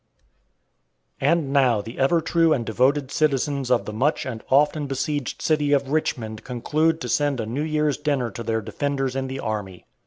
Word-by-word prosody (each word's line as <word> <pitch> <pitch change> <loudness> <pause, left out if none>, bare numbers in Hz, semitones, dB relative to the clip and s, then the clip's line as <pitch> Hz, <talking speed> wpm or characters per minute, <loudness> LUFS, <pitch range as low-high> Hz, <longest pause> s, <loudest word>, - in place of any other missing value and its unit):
And 145 0 +1
now 130 -6 +4
the 115 +5 -8
ever 150 +5 +3
true 165 0 +3
and 120 -5 -1
devoted 130 +5 +1
citizens 140 -3 0
of 125 -2 +2
the 105 - -6
much 140 +8 0
and 115 -4 -6
often 145 +2 +3
besieged 140 0 -3
city 150 -2 +2
of 140 -1 +1
Richmond 110 -8 -2
conclude 155 +6 0
to - - -4
send 145 -3 +1
a 110 - -2
New 120 +6 -3
Year's 150 -2 0
dinner 140 -6 -1
to 120 - -7
their 115 0 -1
defenders 135 +3 -2
in 135 0 -2
the 135 +1 -5
army. 105 -6 -4
135 Hz, 180 wpm, -23 LUFS, 120-150 Hz, -, now